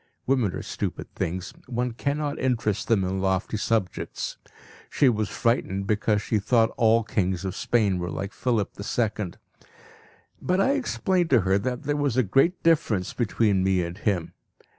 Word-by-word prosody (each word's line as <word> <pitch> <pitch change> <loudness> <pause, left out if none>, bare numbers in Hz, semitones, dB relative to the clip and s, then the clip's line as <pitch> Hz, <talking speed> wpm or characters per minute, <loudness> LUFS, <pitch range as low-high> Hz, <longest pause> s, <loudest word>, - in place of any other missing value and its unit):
Women 125 -8 +1
are - - -5
stupid - - -5
things; 90 +2 -3
one 125 0 -1
cannot 145 +4 -2
interest 110 -5 0
them 110 -4 +3
in 95 +1 -1
lofty 95 +2 0
subjects. 105 -4 -2 0.5
She 140 - +4
was 110 -3 0
frightened 100 -5 0
because 105 0 +1
she 110 - 0
thought 115 +2 +3
all 115 0 +4
kings 95 -4 -1
of 95 - -3
Spain 105 -6 +1
were 90 0 -3
like 100 +4 -4
Philip¬ÝII. 105 -3 -1 1.1
But 185 +1 +1
I 260 +7 +3
explained 190 - 0
to 125 -6 +5
her 95 +1 +2
that 125 +5 -3
there 145 0 0
was 140 -4 0
a 130 - +5
great 135 - +2
difference 120 - +2
between 100 -3 +1
me 95 -1 +2
and 85 +1 -5
him. 100 -6 -1
110 Hz, 160 wpm, -25 LUFS, 95-125 Hz, 1.1 s, to